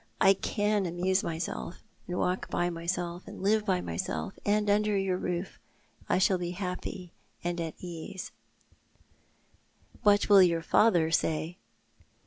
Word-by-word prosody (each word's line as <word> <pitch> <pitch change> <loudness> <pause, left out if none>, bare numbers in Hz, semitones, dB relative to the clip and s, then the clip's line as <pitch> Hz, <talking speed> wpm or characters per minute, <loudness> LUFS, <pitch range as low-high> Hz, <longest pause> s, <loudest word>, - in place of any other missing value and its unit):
I 195 - +7
can 205 0 0
amuse 185 +3 +1
myself, 165 +1 -4 0.2
and 180 - -3
walk 180 +1 -1
by 175 0 0
myself, 170 +1 -3
and - - -9
live 215 +1 +2
by 185 -2 +2
myself, 190 +1 -3
and 210 +1 +1
under 210 0 +2
your 195 -1 0
roof 180 0 -3 0.5
I - - +3
shall 185 0 +3
be 175 -1 -3
happy 180 -1 -5 0.3
and 175 0 -2
at 165 -1 -4
ease," 175 +1 -7 0.8
" - - -32
What 205 0 +4
will 200 -2 +8
your 170 -2 +3
father 170 -7 +4
say 160 +2 0
180 Hz, 140 wpm, -29 LUFS, 175-200 Hz, 0.8 s, will